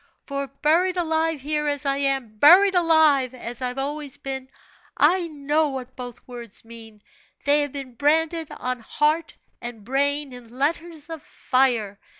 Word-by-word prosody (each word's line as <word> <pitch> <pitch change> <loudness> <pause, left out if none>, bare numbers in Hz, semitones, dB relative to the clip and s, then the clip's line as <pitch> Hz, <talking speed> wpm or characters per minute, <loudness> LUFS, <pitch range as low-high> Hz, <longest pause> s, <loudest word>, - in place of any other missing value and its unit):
For, 280 -1 -3
buried 330 +7 +1
alive 320 -3 0
here, 300 +1 -1
as 285 0 -1
I 275 0 +1
am 270 -6 -1
buried 375 - +7
alive, 315 -7 +4
as 240 0 -6
I've 250 0 -3
always 285 0 -4
been 265 -1 -5 0.5
I 360 -2 +4
know 300 0 0
what 260 -2 -7
both 245 -2 -9
words 235 -4 -6
mean; 225 -2 -12 0.4
they 290 +1 +4
have 290 -2 -3
been 270 -3 -7
branded 320 +4 +1
on 255 0 -4
heart 305 +7 0 0.3
and 240 -3 -7
brain 285 +2 0
in 245 0 -12
letters 320 +2 -2
of 320 -2 -6
fire. 240 -9 0
280 Hz, 155 wpm, -24 LUFS, 255-310 Hz, 0.5 s, buried